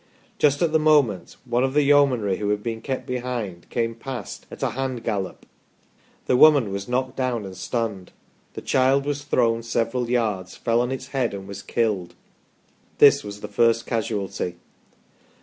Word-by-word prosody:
Just 145 +1 +3
at 165 - +2
the 160 - +3
moment, 145 - +2
one 120 +2 +1
of 135 +1 -1
the 150 - +5
Yeomanry 135 -9 +3
who 105 -1 -2
had 105 0 -1
been 115 -1 -4
kept 135 -2 -4
behind, 120 -8 -4
came 115 -1 -1
past 120 -1 -7
" - - -35
at - - -8
a - - +1
hand 130 -2 -3
gallop 100 -5 -3 0.4
". - - -35
The - - +2
woman 140 -6 +6
was 100 0 -4
knocked 130 +1 -1
down 125 -5 -1
and 95 -1 -8
stunned; 105 -2 -3 0.4
the - - -5
child 135 +1 +2
was 145 0 -2
thrown 115 -5 +1
several 115 +1 -1
yards, 105 -7 -1
fell 115 0 +1
on 125 +1 -1
its 130 0 -5
head, 130 -6 -1
and 95 -1 -8
was 100 0 -7
killed. 105 -4 -1 0.8
This 140 -1 +6
was 105 0 -8
the - - -5
first 115 +2 +2
casualty. 105 -6 -2
115 Hz, 180 wpm, -23 LUFS, 105-130 Hz, 0.8 s, woman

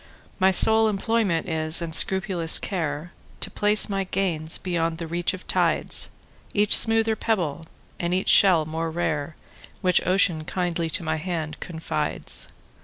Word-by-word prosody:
My 190 0 +4
sole 220 +4 +5
employment 210 -4 -1
is, 155 -1 +2
and 170 -2 -5
scrupulous 190 -2 +2
care, 170 -2 -4 0.3
To - - 0
place 210 0 +4
my 195 -2 -2
gains 175 -4 -2
beyond 165 -2 -2
the 170 - -6
reach 170 +2 -2
of 185 - -14
tides,—Each 205 0 0
smoother 225 0 +3
pebble, 170 -9 -2 0.3
and 170 0 -2
each 185 +1 -1
shell 180 -6 +5
more 160 +1 -4
rare, 155 -2 -3 0.5
Which 180 -1 +2
Ocean 180 -4 +2
kindly 170 -1 -3
to 165 - 0
my 160 0 -2
hand 160 -2 -5
confides. 165 -2 -3
175 Hz, 140 wpm, -23 LUFS, 160-195 Hz, 0.5 s, sole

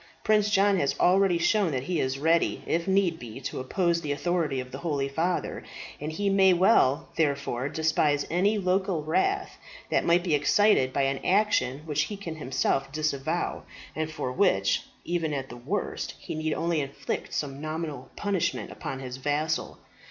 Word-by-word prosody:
Prince 210 -1 +3
John 200 -1 +3
has 140 - +1
already 185 0 +4
shown 200 +2 +2
that 130 -1 -1
he 175 +2 -1
is 130 0 -1
ready, 165 +4 +1
if 170 +2 -1
need 190 -3 +2
be, 120 +1 -8
to 130 - -4
oppose 170 +5 0
the 150 -3 -3
authority 150 -1 0
of 125 0 -6
the 135 - -6
holy 145 -4 -1
father, 165 +6 -2 0.4
and 150 +2 -4
he 200 +6 -2
may 195 -1 +5
well, 170 - +3
therefore, 140 -4 0
despise 155 -2 +1
any 200 +5 +2
local 185 -3 0
wrath 380 - 0 0.3
that - - +2
might 170 +1 +3
be 175 -4 0
excited 145 -1 +4
by 140 - +1
an 135 0 -1
action 185 -9 +2
which 150 -1 0
he 205 - -6
can 170 -5 -6
himself 135 -1 0
disavow, 155 +2 -1 0.3
and 155 0 -2
for 155 -5 -4
which, 125 - +2 0.2
even 165 -3 -1
at 135 -1 -4
the - - -9
worst, 120 - -3
he - - -7
need 155 0 -1
only 170 -2 0
inflict 140 -1 -4
some 140 -1 -3
nominal 155 -4 -5
punishment 180 - -1
upon 135 - -6
his 130 -1 -6
vassal. 150 +3 -1
155 Hz, 175 wpm, -27 LUFS, 140-180 Hz, 0.4 s, may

